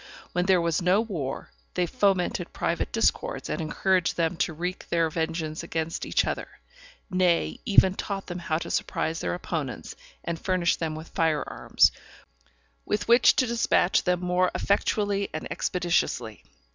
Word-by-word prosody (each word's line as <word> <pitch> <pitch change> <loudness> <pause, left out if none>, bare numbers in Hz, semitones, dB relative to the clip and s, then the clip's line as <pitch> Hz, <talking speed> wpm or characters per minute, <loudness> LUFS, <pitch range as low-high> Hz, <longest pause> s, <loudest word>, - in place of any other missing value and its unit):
When 180 +1 0
there 190 -2 +5
was 170 +1 0
no 180 +3 +4
war, 170 - -4 0.2
they 180 - +2
fomented 185 +1 0
private - - -1
discords, - - 0
and - - -2
encouraged 180 +3 +1
them 165 0 +1
to 180 - 0
wreak 180 +4 -5
their 165 -2 +1
vengeance 160 -1 -2
against 165 -1 -3
each - - +2
other; - - -3 0.6
nay, 175 - +2
even 190 -2 +5
taught 195 0 -4
them 175 0 -5
how 160 -2 -1
to 170 - -5
surprise 160 +1 -1
their - - -2
opponents, 155 -7 -5 0.3
and 170 -1 -4
furnished 185 -2 +1
them 160 -2 -2
with 160 +1 -9
fire 160 -5 +1
arms, - - +3 0.9
with 210 - -2
which 235 +2 +6
to 255 - +3
dispatch 230 -6 +2
them 180 -1 +1
more 180 0 +2
effectually 200 0 0
and 155 - -4
expeditiously. 175 -1 -1
175 Hz, 155 wpm, -26 LUFS, 165-190 Hz, 0.9 s, which